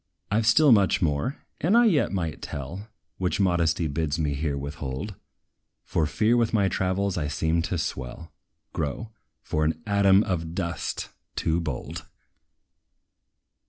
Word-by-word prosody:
I 105 Hz, +2 st, +3 dB
've 110 Hz, -, -2 dB
still 145 Hz, +5 st, +6 dB
much 100 Hz, -4 st, +5 dB
more, 80 Hz, -, 0 dB, 0.2 s
that 185 Hz, +7 st, +2 dB
I 240 Hz, 0 st, +6 dB
yet 150 Hz, -, +3 dB
might 85 Hz, -6 st, -3 dB
tell, 80 Hz, +9 st, -6 dB, 0.3 s
Which 90 Hz, +1 st, 0 dB
modesty 85 Hz, -3 st, +2 dB
bids 75 Hz, 0 st, -1 dB
me 75 Hz, -3 st, 0 dB
here 70 Hz, 0 st, -1 dB
withhold; 70 Hz, +5 st, -5 dB, 0.7 s
For 80 Hz, -, 0 dB
fear 105 Hz, +10 st, +2 dB
with 115 Hz, -1 st, +2 dB
my 100 Hz, -3 st, +3 dB
travels 95 Hz, 0 st, 0 dB
I 75 Hz, -, -1 dB
seem 80 Hz, +2 st, 0 dB
to 85 Hz, +2 st, -2 dB
swell, 70 Hz, +1 st, -5 dB, 0.4 s
grow, 110 Hz, +10 st, -3 dB, 0.3 s
for 75 Hz, -, -1 dB
an 80 Hz, +1 st, +2 dB
ATOM 100 Hz, -1 st, +5 dB
OF 85 Hz, -4 st, -3 dB
DUST, 85 Hz, -3 st, -3 dB, 0.3 s
too 80 Hz, +1 st, +1 dB
bold! 70 Hz, -7 st, -5 dB
85 Hz, 145 wpm, -26 LUFS, 75-100 Hz, 0.7 s, still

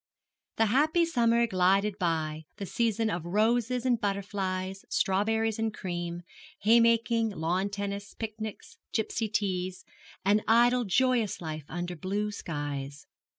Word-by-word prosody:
The 225 Hz, -, +3 dB
happy 305 Hz, +9 st, +3 dB
summer 235 Hz, -6 st, +3 dB
glided 195 Hz, 0 st, +2 dB
by 160 Hz, -3 st, -1 dB
the 200 Hz, -, -4 dB
season 225 Hz, 0 st, 0 dB
of 170 Hz, -3 st, -3 dB
roses 230 Hz, +6 st, +1 dB
and 245 Hz, -3 st, +2 dB
butterflies, 195 Hz, -1 st, -2 dB
strawberries 220 Hz, +3 st, +1 dB
and 225 Hz, 0 st, 0 dB
cream, 175 Hz, -3 st, -4 dB, 0.4 s
haymaking, 230 Hz, +1 st, +4 dB
lawn 180 Hz, +1 st, -1 dB
tennis, 200 Hz, 0 st, -5 dB
picnics, 220 Hz, -1 st, -6 dB, 0.2 s
gipsy 220 Hz, 0 st, -1 dB
teas 185 Hz, -3 st, -2 dB, 0.4 s
an 205 Hz, +2 st, +4 dB
idle, 240 Hz, +2 st, +4 dB
joyous 240 Hz, +1 st, +2 dB
life 155 Hz, -3 st, -5 dB
under 175 Hz, +1 st, -4 dB
blue 200 Hz, +5 st, -2 dB
skies. 145 Hz, -6 st, -5 dB
205 Hz, 120 wpm, -29 LUFS, 180-225 Hz, 0.4 s, haymaking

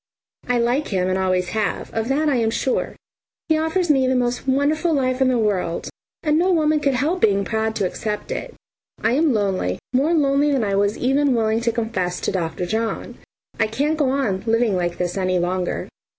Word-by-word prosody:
I 250 Hz, -, +3 dB
like 245 Hz, +5 st, +1 dB
him 185 Hz, -2 st, 0 dB
and 185 Hz, -, +1 dB
always 185 Hz, -1 st, 0 dB
have, 215 Hz, -2 st, -2 dB
of 225 Hz, 0 st, -1 dB
that 290 Hz, +4 st, +1 dB
I 280 Hz, -4 st, +2 dB
am 225 Hz, -2 st, +1 dB
sure. 250 Hz, +3 st, -1 dB, 0.5 s
He 315 Hz, -, +4 dB
offers 320 Hz, +1 st, +1 dB
me 265 Hz, -3 st, +3 dB
the 260 Hz, -, +2 dB
most 245 Hz, +1 st, -1 dB
wonderful 290 Hz, +5 st, +1 dB
life 255 Hz, -1 st, 0 dB
in 265 Hz, -, +4 dB
the 255 Hz, -1 st, +2 dB
world, 195 Hz, -6 st, -1 dB, 0.3 s
and 305 Hz, 0 st, +2 dB
no 365 Hz, +2 st, +2 dB
woman 310 Hz, -3 st, +2 dB
could 280 Hz, -3 st, +1 dB
help 310 Hz, +8 st, 0 dB
being 200 Hz, -2 st, +3 dB
proud 220 Hz, 0 st, -1 dB
to 200 Hz, -, 0 dB
accept 210 Hz, +3 st, -4 dB
it. -, -, -5 dB, 0.5 s
I -, -, +3 dB
am 300 Hz, +4 st, +3 dB
lonely, 195 Hz, -, 0 dB, 0.2 s
more 290 Hz, +7 st, +2 dB
lonely 285 Hz, -1 st, +2 dB
than 270 Hz, -5 st, +1 dB
I 200 Hz, -2 st, -1 dB
was 200 Hz, +1 st, +1 dB
even 270 Hz, +1 st, +2 dB
willing 220 Hz, 0 st, +1 dB
to 235 Hz, 0 st, +1 dB
confess 220 Hz, -6 st, -2 dB
to -, -, -1 dB
Dr. 175 Hz, -1 st, -2 dB
John. 220 Hz, +4 st, -3 dB, 0.4 s
I 220 Hz, -, +3 dB
can't 285 Hz, +8 st, 0 dB
go 280 Hz, -3 st, +2 dB
on 255 Hz, -9 st, 0 dB
living 225 Hz, -2 st, +2 dB
like 175 Hz, -1 st, -1 dB
this 180 Hz, +1 st, -2 dB
any 185 Hz, -1 st, +1 dB
longer. 180 Hz, +1 st, -1 dB
235 Hz, 205 wpm, -21 LUFS, 195-280 Hz, 0.5 s, He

